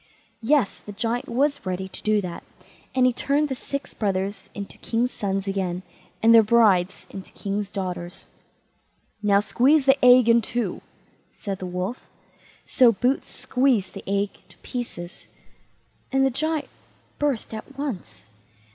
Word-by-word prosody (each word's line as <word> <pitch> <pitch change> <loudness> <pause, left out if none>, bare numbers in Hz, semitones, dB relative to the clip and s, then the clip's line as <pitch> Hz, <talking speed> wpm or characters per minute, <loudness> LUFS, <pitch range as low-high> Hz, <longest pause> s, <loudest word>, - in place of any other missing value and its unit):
Yes, 245 -3 +2
the 205 - -10
Giant 230 +4 -2
was 280 +5 +1
ready 185 0 -3
to - - -9
do 215 -1 +2
that, 175 -3 -6 0.5
and 255 -1 +4
he 255 - +4
turned 290 +4 +1
the - - -1
six 280 +2 -5
brothers 195 -1 -2
into 200 -1 -7
king's 240 +2 0
sons 195 -1 -2
again, 185 -2 -2 0.4
and 230 +1 +7
their 230 - +9
brides 210 -5 +3
into 195 -1 -9
king's 200 0 -3
daughters. 180 -3 -5 1.0
"Now, 200 -1 +4
squeeze 270 +7 +3
the 270 0 +4
egg 250 -1 +7
in 235 0 +6
two", 240 +2 -2 0.5
said 195 -2 -6
the 185 - -5
Wolf. 180 +7 -4 0.6
So 250 -2 +5
Boots 250 +5 0
squeezed 250 -8 +1
the - - -8
egg 200 +1 0 0.2
to - - -19
pieces, 205 -9 -6 0.8
and 270 0 +3
the 270 - +2
Giant 310 +3 -1 0.5
burst 280 -7 -1
at 240 +5 -8
once. 185 - -6
220 Hz, 145 wpm, -24 LUFS, 195-255 Hz, 1.0 s, their